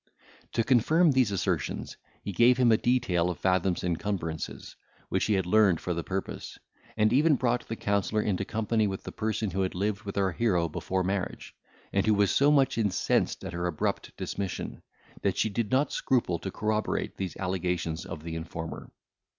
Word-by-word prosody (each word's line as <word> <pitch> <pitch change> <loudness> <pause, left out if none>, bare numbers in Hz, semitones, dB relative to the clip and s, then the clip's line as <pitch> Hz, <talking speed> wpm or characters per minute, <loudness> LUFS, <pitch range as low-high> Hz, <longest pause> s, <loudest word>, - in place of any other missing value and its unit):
To 115 - +2
confirm 150 +8 +4
these 130 -5 +3
assertions, 100 - -2 0.3
he 100 - -3
gave 120 +6 +5
him 125 -2 +4
a - - +7
detail 110 -10 +1
of 90 - -3
Fathom's 95 -1 +1
encumbrances, 85 -2 -3 0.3
which - - +1
he 105 - +2
had 95 -2 +1
learned 100 -3 +4
for 90 - -2
the 85 0 -3
purpose, 95 +2 -5 0.4
and 110 +1 +3
even 150 +3 +5
brought 120 -1 0
the 115 - -3
counsellor 105 0 0
into 100 -1 0
company 110 +1 0
with 95 -1 -4
the - - -6
person 110 -1 -2
who 95 +2 -1
had 95 -1 -1
lived 100 +2 -1
with 100 -2 -6
our 95 -1 +2
hero 90 -5 +1
before 95 +4 -2
marriage, 95 0 -3 0.4
and 100 +1 +1
who 110 - +5
was 100 -1 +3
so 140 +1 +4
much 135 -5 +3
incensed 105 -5 +1
at - - -6
her 85 0 -1
abrupt 80 -4 -2
dismission, 90 -11 -4 0.4
that - - 0
she 110 - +2
did 105 +1 -2
not 135 +2 +2
scruple 115 -10 +1
to 95 - -4
corroborate 110 +2 -1
these 95 -2 -4
allegations 90 -3 -2
of 75 - -7
the 80 0 -5
informer. 80 0 -6
100 Hz, 185 wpm, -28 LUFS, 90-115 Hz, 0.4 s, a